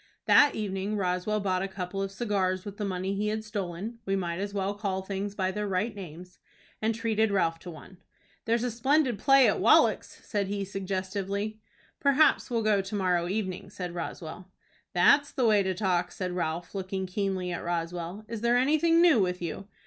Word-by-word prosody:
That 290 Hz, -, +6 dB
evening 205 Hz, 0 st, -2 dB
Roswell 185 Hz, +2 st, 0 dB
bought 185 Hz, -2 st, 0 dB
a 195 Hz, -, -1 dB
couple 190 Hz, 0 st, -5 dB
of 195 Hz, 0 st, -3 dB
cigars 190 Hz, -3 st, -1 dB
with 205 Hz, -1 st, -7 dB
the 210 Hz, -, -3 dB
money 190 Hz, 0 st, -2 dB
he 205 Hz, +2 st, -1 dB
had 215 Hz, +1 st, -2 dB
stolen 205 Hz, +1 st, -5 dB
(we 195 Hz, -1 st, 0 dB
might 175 Hz, -2 st, -2 dB
as 200 Hz, +1 st, -3 dB
well 200 Hz, 0 st, -1 dB
call 195 Hz, -2 st, -3 dB
things 195 Hz, +1 st, -4 dB
by 190 Hz, -2 st, 0 dB
their 210 Hz, +2 st, -3 dB
right 200 Hz, +4 st, -1 dB
names), 180 Hz, -1 st, -10 dB, 0.4 s
and 220 Hz, +1 st, +1 dB
treated 220 Hz, -1 st, +1 dB
Ralph 165 Hz, -5 st, +1 dB
to 180 Hz, -, -9 dB
one. 175 Hz, +3 st, -12 dB, 0.5 s
"There's 230 Hz, +1 st, +1 dB
a 250 Hz, -, -1 dB
splendid 255 Hz, 0 st, +1 dB
play 270 Hz, +3 st, +6 dB
on -, -, +2 dB
at -, -, -4 dB
Wallack's," -, -, +4 dB
said 205 Hz, -2 st, -1 dB
he, 200 Hz, 0 st, -2 dB
suggestively. 195 Hz, +2 st, -3 dB, 0.4 s
"Perhaps 280 Hz, +2 st, +3 dB
we'll 230 Hz, -2 st, 0 dB
go 210 Hz, -2 st, +3 dB
to 195 Hz, +2 st, -6 dB
morrow 180 Hz, -3 st, +1 dB
evening," 190 Hz, -2 st, -3 dB
said 180 Hz, -3 st, -6 dB
Roswell. 175 Hz, +1 st, -6 dB, 0.4 s
"That's 285 Hz, 0 st, +4 dB
the 260 Hz, -4 st, 0 dB
way 210 Hz, -2 st, +5 dB
to 190 Hz, -1 st, -1 dB
talk," 180 Hz, -2 st, 0 dB
said 185 Hz, -1 st, -4 dB
Ralph, 170 Hz, -1 st, -3 dB
looking 190 Hz, -1 st, -3 dB
keenly 185 Hz, -1 st, -2 dB
at 175 Hz, -, -4 dB
Roswell. 175 Hz, +3 st, -4 dB
"Is 230 Hz, -2 st, -5 dB
there 235 Hz, +1 st, +3 dB
anything 310 Hz, +6 st, +4 dB
new 335 Hz, -9 st, +6 dB
with 180 Hz, -1 st, 0 dB
you?" 175 Hz, +3 st, -5 dB
195 Hz, 195 wpm, -28 LUFS, 185-215 Hz, 0.5 s, That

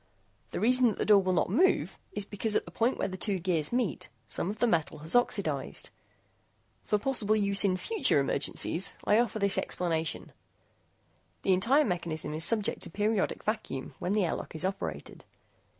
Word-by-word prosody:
The -, -, -4 dB
reason 250 Hz, +2 st, +4 dB
that 215 Hz, -, -1 dB
the -, -, -1 dB
door 205 Hz, -2 st, +6 dB
will 185 Hz, -1 st, -1 dB
not 175 Hz, -, 0 dB
move 370 Hz, -, +2 dB
is 205 Hz, -, -4 dB
because 210 Hz, +1 st, -2 dB
at -, -, +1 dB
the 170 Hz, -, -11 dB
point 230 Hz, +8 st, 0 dB
where -, -, -1 dB
the 185 Hz, -1 st, -6 dB
two 195 Hz, +1 st, +1 dB
gears 170 Hz, -4 st, -1 dB
meet, 240 Hz, -, -1 dB, 0.2 s
some 175 Hz, -, -1 dB
of 210 Hz, -, -5 dB
the 240 Hz, -, +2 dB
metal 165 Hz, -8 st, 0 dB
has 160 Hz, -, +3 dB
oxidized. 245 Hz, -, 0 dB, 0.9 s
For 210 Hz, -, +1 dB
possible 215 Hz, -2 st, +2 dB
use 200 Hz, -1 st, +2 dB
in 185 Hz, -2 st, +1 dB
future 440 Hz, -, +1 dB
emergencies, -, -, +1 dB
I 210 Hz, -, +3 dB
offer 235 Hz, -3 st, 0 dB
this 200 Hz, -2 st, +1 dB
explanation. 165 Hz, -3 st, -3 dB, 1.1 s
The 190 Hz, -, +3 dB
entire 260 Hz, +11 st, +4 dB
mechanism 170 Hz, -5 st, -3 dB
is 155 Hz, +1 st, +1 dB
subject 215 Hz, 0 st, +2 dB
to -, -, -5 dB
periodic 210 Hz, -1 st, -1 dB
vacuum, 215 Hz, -, -4 dB
when 185 Hz, -, -2 dB
the 210 Hz, -3 st, +2 dB
airlock -, -, -4 dB
door -, -, -6 dB
is 160 Hz, -, -1 dB
operated. 195 Hz, +1 st, -5 dB
200 Hz, 180 wpm, -29 LUFS, 180-225 Hz, 1.1 s, door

